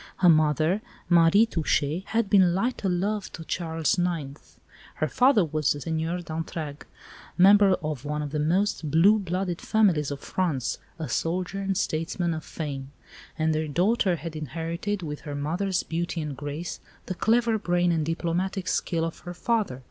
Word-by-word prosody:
Her 180 - +5
mother, 155 +4 +3 0.3
Marie 175 +5 +6
Touchet, 165 -3 0
had 230 -1 0
been 190 -4 +4
"light 235 +6 -1
o' - - +1
love" 195 +3 -1
to 165 - -8
Charles 165 0 -1
IX.; 160 -5 -3 0.4
her - - 0
father 250 -7 +4
was 155 -2 0
the 145 - -8
Seigneur 165 +3 -2
d'Entragues, 160 -2 -5 0.5
member 195 +1 +7
of 150 -4 -3
one 150 0 -2
of 145 - -5
the 150 - -2
most 165 +1 +1
blue 185 +8 +5
blooded 185 -2 -2
families 185 -10 +2
of 140 -1 -5
France, 145 -7 -2 0.2
a 160 -3 -4
soldier 180 +9 -2
and 195 -1 -1
statesman 170 0 -1
of 155 -1 -5
fame; 140 -4 -6 0.5
and 160 -1 +1
their 155 0 -1
daughter 185 +4 +2
had 165 0 -7
inherited, 165 +6 -3
with 150 -2 -5
her 145 -2 -6
mother's 175 +6 -1
beauty 170 +1 -3
and 150 -3 -4
grace, 145 +5 -5 0.3
the - - -3
clever 230 +3 +2
brain 175 -2 +1
and 165 -2 +1
diplomatic 180 +3 -2
skill 165 -1 0
of 165 - -6
her 175 0 -8
father. 215 - -1
170 Hz, 165 wpm, -26 LUFS, 155-190 Hz, 0.5 s, member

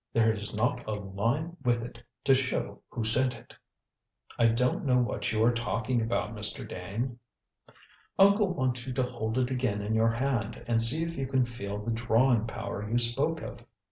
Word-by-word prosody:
There 110 -1 +4
is 105 -1 -6
not 120 +3 0
a 110 - -1
line 115 - -2
with 120 -1 +1
it 120 0 -9 0.2
to 135 - +5
show 130 0 -1
who 120 - -4
sent 125 +4 +2
it." - - -15 0.9
"I 115 - +6
don't 125 +3 +1
know 125 -3 +3
what 120 -4 0
you 110 0 +1
are 120 - +5
talking 115 +1 -1
about, 115 -1 -1
Mr. 105 -1 -2
Dane." 115 +7 -5 1.0
"Uncle 200 0 +5
wants 130 -6 -2
you 130 - -3
to 130 0 +1
hold 120 -2 -3
it 130 0 +1
again 125 -6 -1
in 105 +2 -2
your 110 +1 +3
hand 120 -3 -2
and 115 -1 +2
see 135 +8 +6
if 165 0 -4
you 135 -1 -3
can 130 -1 +2
feel 100 -4 -5
the 105 +3 -3
drawing 120 0 +2
power 105 -2 -5
you 120 - +1
spoke 135 +7 +1
of. 120 - -8
120 Hz, 190 wpm, -29 LUFS, 110-130 Hz, 1.0 s, I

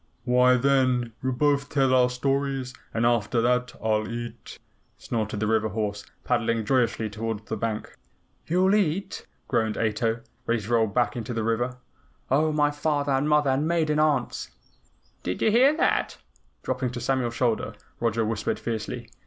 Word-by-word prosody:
"Why, 125 0 +5
then, 130 -3 +2
we'll 130 0 -1
both 140 +2 +1
tell 135 -2 +2
our 125 -1 +5
stories, 135 0 -1 0.2
and 115 +1 0
after 120 0 +2
that 125 +1 +1
I'll 110 -1 +1
eat," 120 0 -7 0.4
snorted 110 -3 -3
the 110 - 0
river 110 0 +1
horse, 105 0 -3 0.2
paddling 115 -2 0
joyously 115 -2 +1
toward 110 0 -4
the 110 - -3
bank. 110 0 -4 0.5
"You'll 185 +4 +3
EAT!" 195 -2 0 0.2
groaned 110 -3 0
Ato, 115 +1 0 0.3
ready 115 0 +2
to 105 +1 -8
roll 115 -2 +3
back 120 +4 0
into 120 0 -4
the 115 - -1
river. 120 +3 -1 0.5
"Oh, 155 +3 +3
my 150 -1 +2
father 145 -1 -1
and 135 +3 +1
mother 150 -2 +3
and 140 +4 +1
maiden 160 -3 +1
aunts!" 150 -5 0 0.7
"Did 90 - -3
you 220 - +3
hear 265 +7 +5
that?" - - +1 0.5
Dropping 130 0 -1
to 120 - -4
Samuel's 120 -1 -1
shoulder, 120 -3 0 0.2
Roger 115 -1 +1
whispered 110 -1 -1
fiercely. 115 +1 -4
125 Hz, 160 wpm, -26 LUFS, 115-140 Hz, 0.7 s, Why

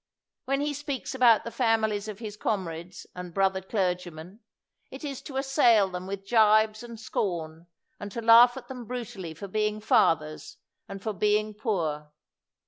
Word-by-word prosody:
"When 275 +1 0
he 295 0 -1
speaks 285 -2 -5
about 245 -4 +5
the 235 - -6
families 220 -4 0
of 210 -2 -6
his 215 -2 -7
comrades 180 -5 -4
and 180 -2 -8
brother 190 -1 +1
clergA 180 -2 -1
men, 170 +7 -12 0.5
it - - -10
is 280 -3 -5
to 265 - -7
assail 245 -7 +4
them 180 0 -6
with 195 0 -6
gibes 215 -1 +4
and 235 -2 -9
scorn, 170 -6 -4 0.3
and 205 0 -7
to 235 - -5
laugh 230 +2 +7
at 260 - -9
them 250 -2 -8
brutally 210 -9 -6
for 200 +5 -8
being 210 +1 -1
fathers 155 -7 +1 0.3
and 195 0 -8
for 220 - -2
being 210 +2 +1
poor. 160 - -2
210 Hz, 165 wpm, -27 LUFS, 185-235 Hz, 0.5 s, laugh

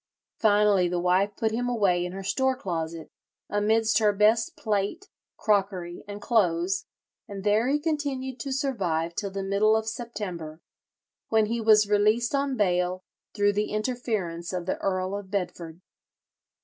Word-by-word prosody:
Finally 205 -3 +4
the 175 0 -1
wife 180 +3 +2
put 220 -1 0
him 245 +2 -1
away 195 -7 +2
in 180 - -4
her 195 +1 -7
store 260 +7 +1
closet, 165 -7 -5 0.4
amidst 215 +1 +2
her 210 -2 +4
best 215 +3 +2
plate, 215 - -2 0.3
crockery, 190 -4 0
and 205 0 -7
clothes, 190 -3 +1 0.4
and 200 -1 -7
there 210 +3 +2
he 285 +2 +2
continued 285 -4 -3
to 275 - -4
survive 185 - -1
till 200 +3 -3
the 195 0 -4
middle 200 +3 +3
of 220 0 -1
September, 200 -9 -5 0.7
when 220 -1 +3
he 230 +2 -2
was 215 -1 +5
released 215 +4 +2
on 275 -2 0
bail 180 -2 +1 0.3
through 205 -1 +3
the 210 +1 -1
interference 215 -7 -2
of 180 -1 -3
the 185 - -2
Earl 185 0 -1
of 200 -2 -7
Bedford." 180 -3 -4
205 Hz, 150 wpm, -26 LUFS, 185-225 Hz, 0.7 s, was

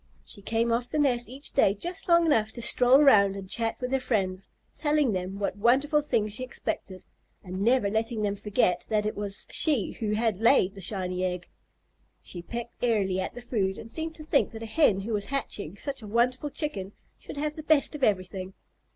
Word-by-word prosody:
She 200 - -9
came 230 +3 0
off 235 +1 0
the - - -2
nest 245 -6 +1
each 270 +3 -5
day 200 -7 +3
just 355 - -5
long 340 0 +5
enough 220 -9 +2
to 235 - -7
stroll 245 +3 +5
around 200 -8 +5
and 195 -1 -8
chat 225 +3 0
with 250 0 -4
her 270 - +2
friends, 195 -6 -2 0.3
telling 295 -4 +1
them 185 +1 -4
what 200 -1 -2
wonderful 275 +8 +3
things 225 -8 -1
she 255 - -2
expected, 190 -6 -5 0.4
and 185 0 -6
never 235 0 +3
letting 220 +1 -1
them 200 -1 0
forget 195 -4 0
that 210 -1 +1
it 215 - -2
was 205 -1 -4
she 285 - +3
who 210 -2 -3
had 220 -2 0
laid 220 -3 +4
the 195 - -10
shiny 185 -1 -1
egg. 180 -1 -3 0.7
She 175 - -9
pecked 235 +7 -7
airily 200 -6 +1
at 185 - -4
the 245 - -7
food, 195 -6 -1
and 225 - -7
seemed 320 +2 -4
to 310 - -10
think 300 -2 +2
that 225 0 -7
a - - -4
Hen 220 -5 +2
who 220 +3 -4
was 205 -1 -1
hatching 205 - -4
such 275 +4 -3
a 215 - -9
wonderful 250 +6 +1
Chicken 205 - -3 0.3
should - - -10
have 300 +1 -2
the 310 - -6
best 310 -1 +2
of 295 -3 -6
everything. 190 -2 -1
225 Hz, 210 wpm, -27 LUFS, 195-265 Hz, 0.7 s, long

